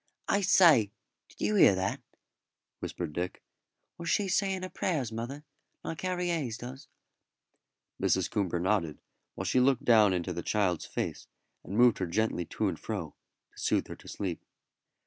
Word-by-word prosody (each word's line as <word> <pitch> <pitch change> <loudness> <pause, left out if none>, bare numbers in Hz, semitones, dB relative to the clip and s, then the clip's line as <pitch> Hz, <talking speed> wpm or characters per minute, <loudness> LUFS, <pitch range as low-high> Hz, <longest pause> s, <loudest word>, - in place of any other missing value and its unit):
"I 205 - +2
say, 165 - +6 0.4
did - - -18
you 105 - +1
hear 100 -1 +6
that?" 95 +1 -2 0.8
whispered 75 - -5
Dick. 90 +2 -4 0.6
"Was 170 0 -4
she 200 +2 +2
saying 190 0 0
her 185 - -4
prayers, 145 -13 -1
mother, 120 +6 -5 0.4
like 165 - -5
Harry 180 -1 -1
Hayes 140 -10 -1
does?" 130 +3 -9 1.1
Mrs. - - +2
Coomber 95 -4 -1
nodded, 90 -4 0 0.4
while - - -4
she 130 - +2
looked 130 0 +3
down 110 -4 +6
into 90 -2 -1
the 85 - -4
child's 95 -4 0
face - - -4 0.4
and 100 - -5
moved 120 -1 +5
her 95 - -1
gently 90 -1 0
to 105 - -2
and 90 -4 -3
fro 95 -9 -4 0.4
to - - -13
soothe - - +1
her - - -6
to - - -16
sleep. 90 -5 -4
110 Hz, 165 wpm, -30 LUFS, 95-155 Hz, 1.1 s, say